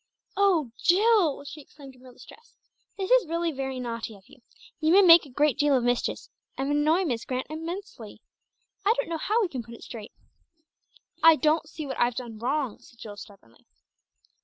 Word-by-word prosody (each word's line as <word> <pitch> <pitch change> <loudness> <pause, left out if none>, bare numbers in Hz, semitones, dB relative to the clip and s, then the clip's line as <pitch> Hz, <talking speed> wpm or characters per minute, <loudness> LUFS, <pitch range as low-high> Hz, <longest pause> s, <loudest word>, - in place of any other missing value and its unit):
"Oh, 365 -10 +2
Jill!" 380 -6 +3
she 285 +2 -10
exclaimed 275 -1 -15
in 255 - -21
real 255 -1 -15
distress. 460 - -17 0.4
"This 385 +1 -4
is - - +5
really 335 +1 -1
very 265 -2 -5
naughty 230 -2 -5
of 195 -1 -20
you. 265 - -19 0.4
You 315 +1 +1
may 395 +3 +7
make 335 -4 +7
a - - -15
great 290 +2 +1
deal 290 -2 +3
of 245 - -1
mischief, 245 0 -1 0.4
and 270 +2 -2
annoy 310 +5 +2
Miss 240 -7 -2
Grant 255 0 -3
extremely. 325 - -7 0.6
I 430 +4 +3
don't - - -2
know 330 -1 -3
how 430 +8 0
we - - 0
can 265 -7 -5
put 235 0 -12
it - - -14
straight." 220 -3 -9 1.1
"I 325 0 +8
don't 310 0 +1
see 315 -2 -7
what 270 - -6
I've 240 0 +1
done 235 -4 -7
wrong," 260 -1 -2
said 235 - -20
Jill 210 -2 -9
stubbornly. 195 - -16
290 Hz, 190 wpm, -26 LUFS, 245-335 Hz, 1.1 s, I